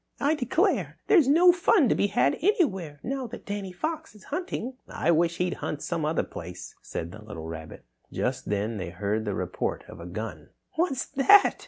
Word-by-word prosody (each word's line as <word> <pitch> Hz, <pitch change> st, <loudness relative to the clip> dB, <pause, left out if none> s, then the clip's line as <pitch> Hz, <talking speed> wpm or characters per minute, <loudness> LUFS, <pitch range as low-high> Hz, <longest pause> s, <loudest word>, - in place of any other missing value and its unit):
"I 285 Hz, +2 st, +3 dB
declare, 315 Hz, -, +1 dB
there's 335 Hz, -10 st, +5 dB
no 340 Hz, +6 st, +7 dB
fun 345 Hz, -, +4 dB
to -, -, +4 dB
be 200 Hz, -, +2 dB
had 140 Hz, -7 st, +2 dB
anywhere 195 Hz, -, +1 dB
now 265 Hz, 0 st, -3 dB
that 240 Hz, -, -9 dB
Danny 200 Hz, -2 st, -4 dB
Fox 315 Hz, -, -4 dB
is 210 Hz, -, -15 dB
hunting." 280 Hz, -, -3 dB
"I 170 Hz, -, +1 dB
wish 170 Hz, +1 st, +2 dB
he'd 180 Hz, 0 st, 0 dB
hunt 150 Hz, -, -3 dB
some 165 Hz, -3 st, -1 dB
other 155 Hz, +1 st, +1 dB
place," 90 Hz, +1 st, -8 dB
said 85 Hz, -, -5 dB
the 110 Hz, -, -10 dB
little 85 Hz, -7 st, -8 dB
rabbit. 80 Hz, -1 st, -8 dB, 0.3 s
Just -, -, -2 dB
then 105 Hz, +2 st, -1 dB
they 90 Hz, -3 st, -4 dB
heard 105 Hz, +5 st, -2 dB
the 100 Hz, -, -1 dB
report -, -, -2 dB
of -, -, -11 dB
a 85 Hz, -, -8 dB
gun. 90 Hz, -5 st, -6 dB, 0.3 s
"What's 315 Hz, -6 st, 0 dB
that?" 390 Hz, +9 st, +6 dB
180 Hz, 190 wpm, -27 LUFS, -, 0.3 s, no